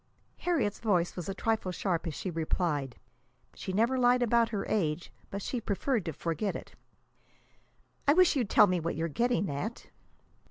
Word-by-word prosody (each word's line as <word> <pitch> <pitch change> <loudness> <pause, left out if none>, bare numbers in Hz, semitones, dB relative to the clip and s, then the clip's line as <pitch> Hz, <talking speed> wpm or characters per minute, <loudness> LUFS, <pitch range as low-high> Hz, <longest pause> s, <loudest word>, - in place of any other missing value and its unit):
Harriet's 290 - 0
voice 180 -6 +1
was 180 +1 -5
a - - -1
trifle 220 -3 0
sharp 175 -2 -1
as 155 - -4
she 185 - -4
replied. 155 -5 -1 0.6
She - - -5
never 230 +7 +2
lied 245 0 +4
about 235 0 +3
her 205 -3 -2
age, 170 -5 -1 0.2
but 200 0 -5
she 245 - -3
preferred 215 +1 -1
to 165 - -2
forget 170 +7 -2
it. - - -8 1.3
"I 285 - +7
wish 360 -1 +5
you'd 245 -7 0
tell - - +7
me 180 -2 +1
what 165 +1 -2
you're 165 +1 -1
getting 235 - +1
at." 150 +12 -5
200 Hz, 170 wpm, -30 LUFS, 170-235 Hz, 1.3 s, I